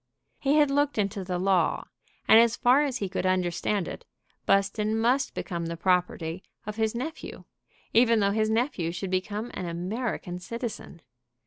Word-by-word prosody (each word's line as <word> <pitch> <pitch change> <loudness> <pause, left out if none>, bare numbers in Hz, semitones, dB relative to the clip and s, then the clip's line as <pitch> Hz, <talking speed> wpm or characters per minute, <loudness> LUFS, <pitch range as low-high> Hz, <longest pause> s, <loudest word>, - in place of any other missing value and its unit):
He 280 +1 +2
had 295 -2 +4
looked 285 -1 +1
into 200 -1 -1
the 180 -1 -3
law, 185 0 +1 0.4
and, 220 - +8
as 230 0 +4
far 255 +4 +4
as 270 -4 -1
he 200 - -2
could 185 - -2
understand 185 +1 0
it, - - -7 0.4
Buston 210 +2 +2
must 250 +4 +1
become 170 -3 -4
the 170 0 -5
property 180 -1 0 0.2
of 210 +1 -6
his 220 0 0
nephew, 310 +7 -6 0.5
even 230 -1 +5
though 200 -1 +2
his 215 +1 +1
nephew 220 - 0
should 180 +2 -5
become 205 +5 -2
an 180 - -4
American 180 +1 -3
citizen. 230 -4 -6
210 Hz, 160 wpm, -27 LUFS, 180-235 Hz, 0.5 s, and